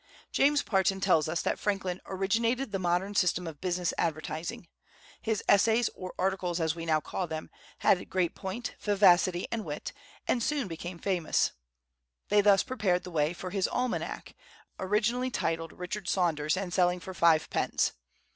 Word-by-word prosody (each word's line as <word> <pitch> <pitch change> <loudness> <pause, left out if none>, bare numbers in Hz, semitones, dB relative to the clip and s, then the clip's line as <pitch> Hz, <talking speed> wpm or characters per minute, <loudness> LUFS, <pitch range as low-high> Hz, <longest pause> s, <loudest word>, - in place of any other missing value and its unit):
James 290 +1 +3
Parton 195 -1 +1
tells 165 -6 +3
us 165 - -1
that - - -1
Franklin 195 -3 -1
"originated 225 +6 0
the 195 - -1
modern 180 +3 0
system 180 -2 +2
of 160 -3 -8
business 180 -1 -1
advertising." 160 +1 -3 0.5
His 220 -2 -1
essays, 225 +3 +4
or 185 -1 -7
articles, 185 -2 0
as 160 -1 +1
we 165 -1 -6
now 155 -1 +3
call 180 +3 -4
them, 160 -1 -6 0.3
had 180 - +2
great 180 -3 0
point, 205 +5 -5
vivacity, 185 -3 +4
and 230 -2 -2
wit, 150 -4 -5 0.3
and 240 - +1
soon 280 -1 0
became 175 +1 -6
famous; 180 -2 +1 0.8
they 205 0 +5
thus 200 -1 +5
prepared 200 -8 0
the 180 - -8
way 150 -1 +1
for 180 +1 -6
his 195 -1 +1
almanac, 250 -1 -3 0.5
originally 220 +6 +1
entitled 165 -9 -2
"Richard 180 +1 -5
Saunders," 160 -3 +1
and 185 -2 -3
selling 180 -1 +3
for 185 +2 -8
five 165 -3 +4
pence. - - +1
185 Hz, 160 wpm, -29 LUFS, 170-205 Hz, 0.8 s, they